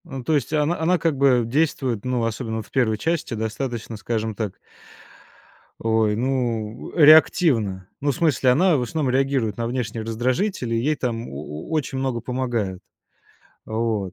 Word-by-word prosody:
Ну, 135 -6 -7
то 160 - 0
есть 145 -5 0
и - - +1
она 155 +3 +1
она 175 +3 +2
как 165 -2 0
бы 130 -3 +4
действует, 130 -4 0
ну, 125 -2 0
особенно 115 0 -3
вот 110 - -5
в - - -28
1-й 115 -5 +1
части, 165 -1 -1
достаточно, 115 +1 -4
скажем 110 0 -2
так 105 -2 -3 1.3
ой, 110 -2 +1
ну, 120 -3 -2
э, 160 - +6
реактивно. 125 - +5
Ну, 145 0 +2
в - - -5
смысле, 155 -6 +2
она 170 +4 +4
в - - -1
основном 140 +1 -1
реагирует 135 -5 +1
на 115 -1 -2
внешние 115 -2 -3
раздражители, 120 - -1
ей 140 +7 +1
там 120 -4 -3
о - - -9
о 75 +1 -8
очень 150 -4 -1
много 130 -3 -1
помогают. 120 -7 -2 0.8
Вот. 110 -4 -2
125 Hz, 170 wpm, -23 LUFS, 110-140 Hz, 1.3 s, э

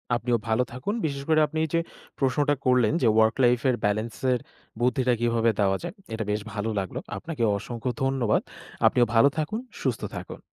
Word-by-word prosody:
আপনিও 120 0 +1
ভালো 110 +3 +2
থাকুন। 130 +12 -3
বিশেষ 140 -2 -3
করে 155 -1 +5
আপনি 160 +2 -6
এই - - -7
যে - - +4 0.4
প্রশ্নটা 145 +2 +2
করলেন 125 -1 +4
যে, 120 - +4
ওয়ার্ক 110 0 +4
লাইফ 120 0 +4
এর 125 - +2
ব্যালেন্স 110 +3 -1 0.2
এর 125 - 0 0.4
বুদ্ধিটা 125 0 +2
কিভাবে 115 -1 +2
দেওয়া 95 -1 +3
যায় - - -5 0.2
এটা 110 0 -2
বেশ 105 +1 -1
ভালো 105 +1 -2
লাগলো। 95 -2 -4 0.2
আপনাকে 160 -7 -4
অসংখ্য 120 +4 -4
ধন্যবাদ। 135 -5 +2 0.5
আপনিও 125 -1 +4
ভালো 115 +5 +7
থাকুন, 155 +8 -1 0.2
সুস্থ - - -1 0.2
থাকুন। - - -8
120 Hz, 180 wpm, -26 LUFS, 110-135 Hz, 0.5 s, ভালো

